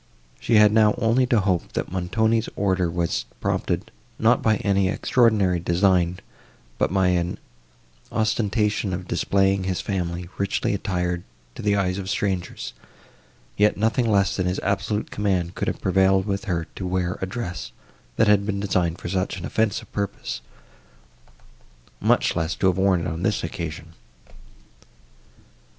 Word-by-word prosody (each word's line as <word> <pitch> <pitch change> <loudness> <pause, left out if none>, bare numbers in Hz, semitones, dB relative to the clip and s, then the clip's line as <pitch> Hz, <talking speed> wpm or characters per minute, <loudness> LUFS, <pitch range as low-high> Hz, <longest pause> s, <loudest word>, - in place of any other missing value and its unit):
She 115 - +1
had 105 -1 +7
now 110 -1 +5
only 120 +3 +2
to 120 -2 +3
hope, 95 -3 -1
that - - -3
Montoni's 110 +5 +1
order 95 -3 +1
was 85 0 -1
prompted, - - -2 0.3
not 115 +2 +3
by 110 -1 +3
any 100 -1 +1
extraordinary 105 -6 +2
design, 90 0 +2 0.6
but - - +1
by 95 -1 +3
an 90 0 0 0.7
ostentation 105 -2 0
of 90 +1 -5
displaying 95 0 +1
his 95 -1 -1
family, 90 -3 -3
richly 100 +1 0
attired, 90 -3 -1 0.3
to - - -8
the 100 -1 +2
eyes 95 -1 0
of 95 -1 -5
strangers; 95 -3 -2 0.8
yet 105 +1 +3
nothing 110 +3 +1
less 100 -2 +2
than 90 -2 0
his 90 - -1
absolute 100 +2 -1
command 95 -4 0
could - - -3
have - - -2
prevailed 95 0 +3
with 100 -2 -2
her 85 -4 -1
to 95 - -3
wear 90 -1 -1
a 95 - -1
dress, 90 - -5 0.4
that 110 - +3
had 105 -1 +5
been 100 -1 -2
designed 90 -4 0
for - - -7
such 95 +2 -1
an 85 - -6
offensive 110 +5 -1
purpose, 100 -11 -4 1.6
much - - +2
less 80 +2 -1
to - - -1
have 95 -1 +3
worn 95 -2 +3
it 85 - -3
on 80 -1 -4
this 105 +3 0
occasion. 85 -1 -6
95 Hz, 150 wpm, -24 LUFS, 90-105 Hz, 1.6 s, had